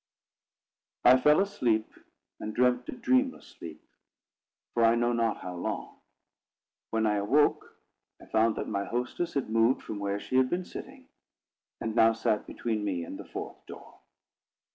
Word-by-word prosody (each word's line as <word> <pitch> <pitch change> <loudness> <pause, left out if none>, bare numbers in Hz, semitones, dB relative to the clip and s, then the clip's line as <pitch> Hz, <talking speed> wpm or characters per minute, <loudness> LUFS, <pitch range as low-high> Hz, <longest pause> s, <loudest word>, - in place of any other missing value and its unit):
I 130 +1 +8
fell 150 +2 +5
asleep, 120 - 0 0.5
and 110 - -5
slept 125 0 +2
a - - -3
dreamless 255 +2 +1
sleep, 80 -2 -11 0.9
for 120 - +2
I 115 +1 +5
know 120 0 +1
not 115 -2 0
how 90 -1 -6
long. 85 - -5 0.9
When 110 0 0
I 105 -1 +2
awoke, 135 +9 +2 0.4
I - - -14
found 110 0 +2
that - - -4
my 100 -1 -2
hostess 125 +9 -3
had 135 -6 -2
moved 115 +3 +3
from 105 - -6
where 100 0 -2
she 130 - -2
had 130 0 +4
been 180 +1 -2
sitting, - - -10 0.7
and 110 - -3
now 115 -1 +5
sat 110 -1 -1
between 110 -3 -3
me 90 -4 -2
and - - -8
the - - -8
fourth - - -8
door. - - -12
115 Hz, 160 wpm, -29 LUFS, 105-130 Hz, 0.9 s, I